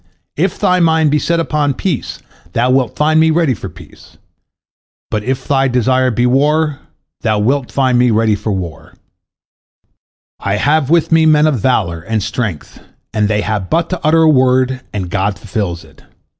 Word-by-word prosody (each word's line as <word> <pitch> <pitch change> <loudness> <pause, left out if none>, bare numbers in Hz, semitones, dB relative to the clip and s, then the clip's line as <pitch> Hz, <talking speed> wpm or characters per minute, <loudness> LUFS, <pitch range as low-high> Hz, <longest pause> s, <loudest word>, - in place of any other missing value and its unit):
If 180 +4 -1
thy 185 -3 +2
mind 160 -3 +2
be 150 - +2
set 170 +2 0
upon 150 -4 0
peace, 170 -5 -3 0.4
thou 125 +2 +1
wilt 130 -3 +1
find 155 +1 +2
me 160 0 +4
ready 160 -4 +2
for 105 - -7
peace. - - -17 0.9
But 105 -1 -2
if 130 +2 -3
thy 135 -1 +2
desire 130 +1 +1
be 120 +1 0
war, 145 +3 +1 0.4
thou 110 -2 0
wilt 125 +5 0
find 130 -3 +1
me 125 0 +3
ready 110 -1 +2
for 105 +1 -3
war. 90 -4 -6 1.4
I 100 0 -1
have 145 +4 +1
with 170 0 +2
me 160 -1 +4
men 150 -1 +4
of 150 -6 +1
valor 95 -8 0
and 110 +4 -2
strength, 105 -6 -5 0.3
they 105 -1 0
have 105 -3 -3
but 165 +1 0
to 180 -2 -4
utter 160 +1 +3
a - - +4
word, 130 -2 +2
and 95 -4 -4
God 100 0 -1
fulfils 95 -5 -4
it. 80 - -20
130 Hz, 170 wpm, -15 LUFS, 105-155 Hz, 1.4 s, me